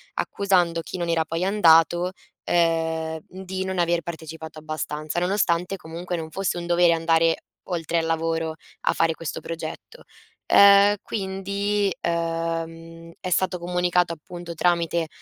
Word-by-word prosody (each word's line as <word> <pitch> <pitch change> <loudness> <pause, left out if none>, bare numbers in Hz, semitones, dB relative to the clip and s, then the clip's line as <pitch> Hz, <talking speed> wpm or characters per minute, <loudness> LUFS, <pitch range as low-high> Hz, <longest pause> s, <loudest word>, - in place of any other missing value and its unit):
accusando 180 -4 +1
chi 185 - -7
non 170 -1 -2
era 165 -1 +2
poi 165 +3 -2
andato, 175 -2 +4 0.3
ehm, 160 -1 +1
di 190 0 -5
non 190 -1 -3
aver 170 0 +2
partecipato 160 -1 -8
abbastanza, 155 +1 -4
nonostante 180 -1 +1
comunque 175 +2 -5
non 160 -1 -6
fosse 195 -2 -1
un 170 - -4
dovere 175 -1 +4
andare 165 0 +2 0.2
oltre 170 -2 -1
al 165 - -1
lavoro 165 0 -1 0.3
a - - +4
fare 165 0 +2
questo 165 -3 -5
progetto. 165 - -7 0.4
Ehm, 200 +1 +7
quindi, 200 0 -1
ehm, 165 0 -3
è 185 - -4
stato 180 0 +1
comunicato 180 0 +1
appunto 170 +1 -9
tramite 170 0 +1
170 Hz, 135 wpm, -24 LUFS, 165-180 Hz, 0.4 s, Ehm